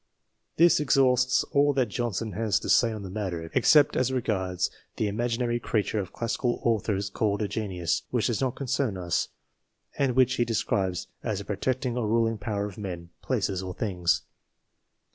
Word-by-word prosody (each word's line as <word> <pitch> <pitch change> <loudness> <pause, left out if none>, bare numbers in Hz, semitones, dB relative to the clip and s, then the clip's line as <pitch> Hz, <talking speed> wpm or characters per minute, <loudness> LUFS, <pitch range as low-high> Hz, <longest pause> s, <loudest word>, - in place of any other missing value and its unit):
This 170 -1 +6
exhausts 130 -3 +3
all 145 0 +4
that 130 -4 +1
Johnson 115 0 -2
has 105 -1 0
to - - -5
say 115 - +5
on 110 -2 -6
the 95 - -6
matter, 90 -5 -4
except 150 -2 +5
as 130 0 +1
regards 95 -8 -1 0.2
the 110 - 0
imaginary 120 +3 -1
creature 110 -2 -1
of 95 -4 -4
classical 120 +1 -1
authors 105 -3 0
called 105 +1 0
a - - 0
Genius, 95 -6 -2
which 120 -3 0
does 120 -1 0
not 130 -2 0
concern 130 -5 -1
us, 85 -2 -1 0.7
and 135 -3 +2
which 130 -1 +3
he 120 - +3
describes 95 -5 -1 0.2
as 105 - -2
the 100 - -6
protecting 125 +5 -1
or 115 -3 0
ruling 115 0 +1
power 100 -1 -2
of 105 0 -8
men, 85 -4 -6
places, 95 -2 -1
or 95 -1 -6
things. 90 -5 0
110 Hz, 170 wpm, -27 LUFS, 100-125 Hz, 0.7 s, This